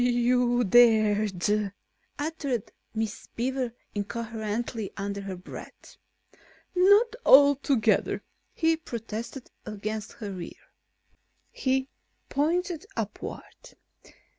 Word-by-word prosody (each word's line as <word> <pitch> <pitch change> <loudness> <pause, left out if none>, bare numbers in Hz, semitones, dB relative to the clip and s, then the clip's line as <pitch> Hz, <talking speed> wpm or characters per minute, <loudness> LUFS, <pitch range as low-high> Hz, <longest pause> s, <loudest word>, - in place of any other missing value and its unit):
"You 245 - +3 0.5
you 245 - +3
dared!" 210 -2 +4 0.4
uttered 290 -7 -3 0.2
Miss 220 -2 -3
Beaver 250 0 -1 0.2
incoherently 220 +1 -3
under 200 0 -3
her 195 -1 -5
breath. 180 - -11 0.8
"Not 405 +5 +5
altogether," 275 -5 +5 0.3
he 325 -1 +2
protested 235 -2 -6
against 215 0 -5
her 200 -5 -6
ear. - - -11 0.8
He 265 0 0 0.4
pointed 345 +5 0
upward. - - -6
230 Hz, 85 wpm, -27 LUFS, 210-280 Hz, 0.8 s, Not